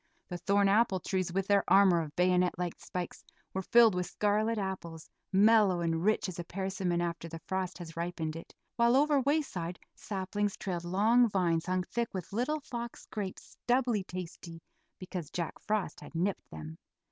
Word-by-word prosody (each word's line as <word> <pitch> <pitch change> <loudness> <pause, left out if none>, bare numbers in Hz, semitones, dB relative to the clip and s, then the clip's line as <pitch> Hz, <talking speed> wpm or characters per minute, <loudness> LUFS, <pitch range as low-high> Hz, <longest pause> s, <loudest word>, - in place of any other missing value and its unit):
The 175 - -5
thorn 200 +2 +3
apple 200 -1 +3
trees, 185 -1 -1
with 195 +2 0
their 200 0 +3
armor 190 -3 +6
of 150 -2 -7
bayonet 180 0 +2
like 175 -1 -2
spikes, 180 -1 -5 0.3
were 190 - -1
filled 230 +2 +6
with 180 0 -1
scarlet 215 +2 +1
apples, 175 -5 -5 0.2
mellow 200 -2 +5
and 165 0 0
rich 215 +1 +2
as 180 -2 -6
a - - -2
persimmon 185 -1 -2
after 170 -1 -3
the 165 - -6
frost 190 -1 -2
has 170 -3 -9
ripened 165 -2 -3
it, 165 - -10 0.2
while 235 +1 +4
over 290 0 +4
wayside 250 - -1 0.2
saplings 205 +1 -3
trailed 175 -3 -4
long 220 +7 +4
vines 170 -4 +1
hung 185 0 +1
thick 235 +4 -2
with 185 0 -5
little 295 +8 0
fox 240 -5 -6
grapes 200 -3 -6
doubly 240 -4 +2
tasty 175 -2 -8 0.4
because 180 -4 -6
Jack 170 -1 -3
Frost 215 -2 -1
had - - -12
nipped 185 +4 -1
them. 80 +1 -9
190 Hz, 170 wpm, -31 LUFS, 175-210 Hz, 0.4 s, armor